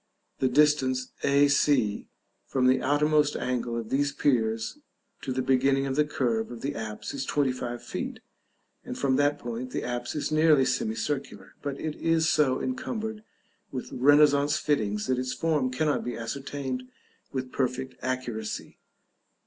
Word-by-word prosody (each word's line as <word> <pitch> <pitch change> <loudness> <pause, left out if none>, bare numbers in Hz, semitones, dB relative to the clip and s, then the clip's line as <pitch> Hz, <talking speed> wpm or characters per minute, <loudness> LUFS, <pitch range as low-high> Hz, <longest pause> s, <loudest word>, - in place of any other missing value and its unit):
The 130 - +3
distance 130 -2 +3
a 140 +1 +4
c 140 -7 +2 0.4
from 130 -2 +1
the 130 +1 +4
outmost 150 +1 +3
angle 125 -2 -2
of 115 -2 -5
these 140 +1 +2
piers 115 -6 0 0.4
to 130 - -4
the 130 0 -1
beginning 135 +1 +3
of 135 -1 -2
the 150 +1 +3
curve 120 -6 -1
of 120 -1 -8
the 140 +1 -2
apse 110 -3 -5
is 135 -1 -3
25 125 -4 -1
feet, - - -5 0.6
and - - -6
from 130 -2 +2
that 145 +1 +2
point 120 -1 -5
the - - -3
apse 120 +1 -3
is 150 - -2
nearly 155 -3 +5
semicircular, 220 - -2
but 140 -1 -4
it 155 -1 -3
is 165 -1 +2
so 140 -5 +3
encumbered 220 - -3 0.5
with 130 - -5
renaissance 145 +2 +5
fittings 105 -10 0
that 130 -1 0
its 130 0 -2
form 150 -6 +1
cannot 145 +3 0
be 120 - -4
ascertained 130 +1 -4 0.4
with 130 -1 -4
perfect 130 0 -2
accuracy. 125 -4 -4
130 Hz, 150 wpm, -27 LUFS, 125-145 Hz, 0.6 s, nearly